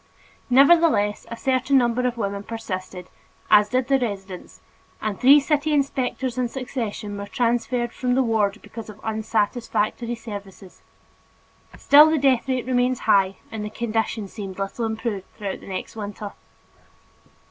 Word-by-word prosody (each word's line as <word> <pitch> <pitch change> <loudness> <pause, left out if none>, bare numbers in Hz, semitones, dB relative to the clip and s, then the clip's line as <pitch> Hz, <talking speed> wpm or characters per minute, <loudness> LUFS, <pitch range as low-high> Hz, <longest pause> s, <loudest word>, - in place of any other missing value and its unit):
Nevertheless, 275 -6 +4
a 230 - -6
certain 265 +2 +2
number 250 0 +2
of 245 -1 -3
women 200 -2 -2
persisted, 185 -5 -6 0.4
as 210 0 +6
did 255 0 0
the 270 -1 +3
residents, 195 -6 -6 0.4
and 215 -3 -3
three 275 +3 +7
city 300 +1 0
inspectors 260 -3 -1
in 245 -1 0
succession 230 -5 -5
were 200 - -6
transferred 240 +2 0
from 250 -1 -1
the 265 - +3
ward 220 -3 0
because 225 -2 -9
of 210 0 -11
unsatisfactory 220 +1 -1
services. 200 -4 -10 1.0
Still 300 +2 +7
the 315 - +2
death 270 -3 +2
rate 255 -2 -1
remained 250 0 +1
high 195 -4 +2
and 220 -1 -5
the 210 - -4
condition 220 -1 -2
seemed 195 -2 -8
little 195 +4 -3
improved 220 -3 -3
throughout 200 -3 -4
the - - -14
next 190 +2 -6
winter. 205 -1 -6
230 Hz, 145 wpm, -23 LUFS, 205-255 Hz, 1.0 s, three